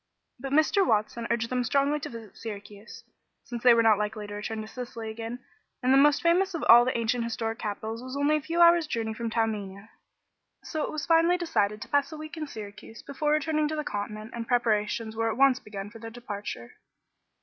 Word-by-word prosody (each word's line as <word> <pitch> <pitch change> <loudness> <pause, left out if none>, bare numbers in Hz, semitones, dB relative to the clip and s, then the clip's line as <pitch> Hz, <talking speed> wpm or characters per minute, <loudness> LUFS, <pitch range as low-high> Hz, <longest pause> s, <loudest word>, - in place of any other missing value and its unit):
But 270 +1 -6
Mr. 310 +7 +4
Watson 225 - 0
urged 235 0 -1
them 250 -1 +1
strongly 280 +4 +1
to - - -6
visit 225 -4 -10
Syracuse, 205 -1 -9 0.4
since 240 -4 -6
they 245 -1 +7
were 230 - +4
not 215 -2 +5
likely 210 0 -3
to 205 - -8
return 210 +2 -4
to - - -9
Sicily 235 -2 -7
again 230 +3 -7 0.4
and 255 +1 +4
the - - +6
most 290 +2 +4
famous 360 +2 +2
of 325 - -3
all 240 +1 +8
the 255 - 0
ancient 235 +1 0
historic 225 -1 -3
capitals 220 +2 -4
was 255 +2 -6
only 290 +2 +3
a - - -4
few 335 +3 -1
hours' 340 -2 +6
journey 225 -5 -2
from 230 +1 -4
Taormina. 215 -2 -2 0.7
So 310 - -4
it - - -2
was 305 -2 -4
finally 335 +3 +4
decided 215 - 0
to - - -13
pass 285 0 +1
a 310 - -7
week 310 +1 -8
in 310 -2 -5
Syracuse 215 -2 -10
before 295 +2 -1
returning 305 0 +1
to 310 - -3
the 305 - -2
continent, 215 -1 -5
and 230 -1 -5
preparations 220 -2 0
were 225 0 0
at 220 - -3
once 270 -1 +5
begun 205 -1 -8
for 225 - -12
their 225 +1 -7
departure. 205 - -7
235 Hz, 215 wpm, -27 LUFS, 220-290 Hz, 0.7 s, all